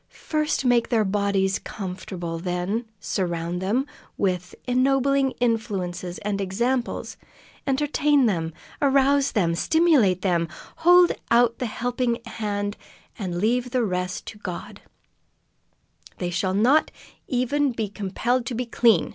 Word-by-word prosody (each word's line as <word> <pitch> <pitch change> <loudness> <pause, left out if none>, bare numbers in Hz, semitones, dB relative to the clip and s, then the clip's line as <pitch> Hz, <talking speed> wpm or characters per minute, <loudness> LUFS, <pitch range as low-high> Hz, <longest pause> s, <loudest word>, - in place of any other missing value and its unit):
First 305 -3 0
make 245 -2 +3
their 225 -3 +2
bodies 195 -1 +1
comfortable, 180 -3 -6
then 180 +6 -2
surround 175 -2 -2
them 225 +8 +1 0.3
with 180 -2 -1
ennobling 270 +2 +2
influences 195 -7 -1
and 200 -1 -1
examples, 235 +6 -1 0.5
entertain 285 0 +2
them, 165 -7 0 0.3
arouse 275 0 +3
them, 170 -5 +2
stimulate 255 - +3
them, 170 -3 +1 0.3
hold 355 +1 +6 0.2
out 235 0 +4
the 250 - -1
helping 245 +1 -1
hand, 205 -2 -3 0.4
and 180 -4 -3
leave 240 +6 +1
the 245 0 +1
rest 180 -2 -3
to 215 - -9
God. 180 -4 -7 1.4
"They 175 -1 -3
shall 185 +2 0
not 255 +10 +4 0.4
even 270 +2 +1
be 225 -3 -2
compelled 220 +5 -1
to 250 - -3
be 250 +2 -2
clean!" 230 -6 +3
220 Hz, 120 wpm, -24 LUFS, 185-255 Hz, 1.4 s, hold